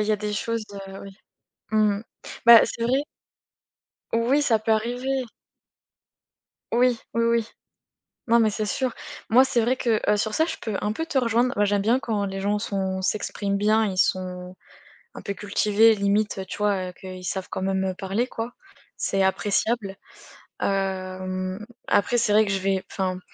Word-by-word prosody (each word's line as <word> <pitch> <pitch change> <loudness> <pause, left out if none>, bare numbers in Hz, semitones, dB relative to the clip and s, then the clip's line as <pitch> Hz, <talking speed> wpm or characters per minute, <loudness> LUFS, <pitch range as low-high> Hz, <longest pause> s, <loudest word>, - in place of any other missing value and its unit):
a - - +3
il 210 - -2
y - - +4
a - - +2
des 210 0 -4
choses, 230 +1 -2
heu, 195 -1 -8
oui. 195 -1 -11 0.5
Mmh 210 -2 +2
mh. - - -9 0.4
Bah, 235 -1 +10
c'est 230 - -5
vrai. 265 +5 +1 1.1
Oui, 240 +5 +3
ça 225 -6 +3
peut 220 +1 0
arriver. 250 +4 -1 1.5
Oui, 245 0 +3 0.2
oui 230 0 +2
oui. 230 -1 +1 0.8
Non 235 0 +5
mais 220 -2 +4
c'est 210 +1 -2
sûr. 255 +5 -1 0.4
Moi 255 +4 +6
c'est 240 -3 +1
vrai 245 +3 +2
que, 230 -4 +1
heu, 210 - +3
sur 215 +1 -1
ça 320 - +3
je 325 - -4
peux 220 -3 -4
un 210 - 0
peu 325 +9 -3
te 295 -5 +1
rejoindre. 240 +1 +1
Moi 205 - +3
j'aime 205 0 +1
bien 240 +4 +3
quand 220 -4 -1
les 195 0 -4
gens 205 +1 +1
sont 190 -2 -2
s'expriment 200 0 -1
bien, 215 +2 +3
ils 190 -2 -3
sont, 180 -1 -1 0.6
un - - -8
peu 200 - -4
cultivés 210 +2 +3
limite, 200 0 0
tu - - -6
vois, 200 -3 0
heu, 180 - -11
que, 190 - -12
ils 185 0 -8
savent 190 +1 -3
quand - - -4
même, 190 0 0
heu, 185 -1 -2
parler 200 +5 -1
quoi. 230 0 -5 0.4
C'est 195 0 0
appréciable. 200 +1 0 0.7
Hem, 185 0 -2 0.2
après 205 +4 +2
c'est 225 -2 +1
vrai 215 +1 +5
que 195 - -2
je 195 - 0
vais 190 0 -1
enfin, 185 -1 -2
210 Hz, 190 wpm, -24 LUFS, 195-230 Hz, 1.5 s, Bah